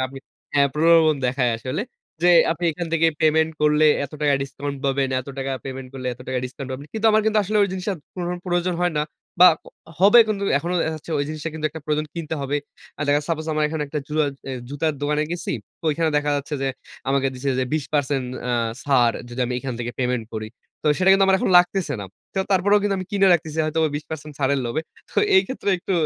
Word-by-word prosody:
আপনি, 135 +1 -10 0.4
হ্যাঁ, 140 -1 +4
প্রলোভন 160 0 +5
দেখায় 125 -1 +1
আসলে। 130 - -3 0.4
যে 175 - +5 0.2
আপনি 170 +1 -5
এখান 175 +2 -4
থেকে 165 0 +3
পেমেন্ট 160 0 +3
করলে, 150 +1 +4 0.2
এত 140 - -10
টাকা 145 -1 +3
ডিসকাউন্ট 140 +1 -5
পাবেন। 135 0 +1
এত 130 - -12
টাকা 135 0 -2
পেমেন্ট 130 -1 -6
করলে, 130 -1 -6
এত 120 - -22
টাকা 130 - -1
ডিসকাউন্ট 130 +1 -7
পাবেন। 135 +3 -7
কিন্তু 220 0 +1
আমার 215 0 +4
কিন্তু 220 0 +3
আসলে 210 +2 -1
ওই 200 - +2
জিনিসটা 190 +2 -2 0.2
কোনো 180 - -4
রকম 180 0 -4
প্রয়োজন 175 0 0
হয় 175 -2 +2
না - - +2 0.4
বা 180 - +11 0.2
অ - - -12 0.3
হবে 205 +5 +7
কিন্তু 200 -2 -1
এখনো 170 +5 -3
দেখা 160 - 0
যাচ্ছে 155 - -11
ওই 145 - +1
জিনিসটা 155 +1 -4
কিন্তু 155 -1 -1
একটা 160 - -8
প্রয়োজনে 150 0 -1
কিনতে 160 -1 -3
হবে। 140 +2 -1 0.4
অ্যা - - -4
দেখা 145 - +4
যায় 150 - -7
সাপোজ 160 -1 -2
আমার 155 0 +1
এখানে 155 0 -2
একটা 150 +1 -3
জুরা 155 0 +1 0.3
অ - - -3 0.2
জুতার 150 +3 -1
দোকানে 150 +1 +1
গেছি, 175 0 -3 0.3
তো - - -18
ওইখানে 160 +1 0
দেখা 145 0 +1
যাচ্ছে 145 +1 -4
যে - - 0 0.4
আমাকে 135 0 +2
দিছে 135 +2 -4
যে 130 - +1
২০% 145 -3 0 0.2
অ্যা 125 - -1 0.3
ছাড় 125 -5 +3
যদি 120 +1 -6
আমি 125 - -3
এইখান 125 0 -4
থেকে 120 0 -3
পেমেন্ট 125 -2 0
করি। 110 0 -4 0.3
তো - - -4
সেটা 185 +1 +4
কিন্তু 195 0 +5
আমার 190 - +5
এখন - - 0
লাগতেছে 175 -2 +1
না। - - -5 0.3
তো - - -1
তারপরেও 200 +2 +4
কিন্তু 205 -1 +1
আমি 185 - -5
কিনে 195 -1 +4
রাখতেছি 160 -2 0
হয়তোবা 160 +1 +1
২০% 150 0 -6
ছাড়ের 140 0 +1
লোভে। 120 +6 -1 0.3
তো - - -1 0.2
এই 375 - +6
ক্ষেত্রে 260 -5 -5
একটু 185 - -4
150 Hz, 225 wpm, -22 LUFS, 135-175 Hz, 0.4 s, বা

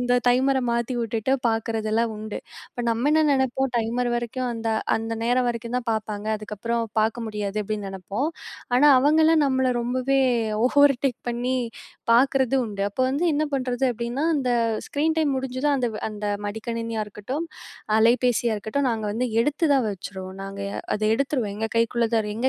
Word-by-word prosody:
இந்த 245 0 +2
டைமரை 260 +1 +3
மாத்தி 235 +2 -1
விட்டுட்டு 230 +3 0
பார்க்குறதெல்லாம் 225 0 0
உண்டு. 215 0 -6 0.3
இப்போ 245 - -5
நம்ம 235 +5 +1
என்ன 315 0 +4
நினைப்போம், 265 0 +1
"டைமர் 240 +2 -1
வரைக்கும் 245 +2 -3
அந்த 225 0 -3 0.3
அந்த 225 0 -4
நேரம் 245 +1 +2
வரைக்கும் 235 +1 -4
தான் 235 - -6
பார்ப்பாங்க, 215 -1 -4
அதுக்கப்புறம் 225 +3 -3 0.2
பார்க்க 225 +1 0
முடியாது." 210 -1 -4
அப்படின்னு 210 -1 -3
நினைப்போம். 195 - -3 0.5
ஆனா 295 +3 +6
அவங்கெல்லாம் 315 +2 +4
நம்மள 260 -1 +1
ரொம்பவே 255 +3 +1 0.5
ஓவர்டேக் 275 -2 +3
பண்ணி 250 +2 -1 0.6
பார்க்குறதும் 265 0 +3
உண்டு. 200 -2 -4
அப்போ 255 - -1
வந்து 290 +6 0
என்ன 305 - +1
பண்ணுறது 255 -1 -1
அப்படின்னா, 235 +6 -2
அந்த 255 -3 0 0.4
ஸ்க்ரீன் 315 +3 0
டைம் 290 -4 +2
முடிஞ்சதும் 265 +2 0
அந்த-அந்த 215 -4 -3 0.2
மடிக்கணினியா 230 +1 -3
இருக்கட்டும், 255 +11 -5 0.5
அலைபேசியா 235 0 +3
இருக்கட்டும் 220 +7 -1
நாங்க 225 -3 -2
வந்து 235 +4 -1
எடுத்து 295 +7 +1
தான் 265 -4 +3
வச்சுருவோம். 190 -1 -7
நாங்க 195 0 -7 0.3
அதை 215 0 0
எடுத்துருவோம். 255 -5 -1
எங்க 225 +1 -1
கைக்குள்ள 230 0 +2
தான் 215 -2 +1
எங்க 250 +4 +1
235 Hz, 150 wpm, -24 LUFS, 220-265 Hz, 0.6 s, ஆனா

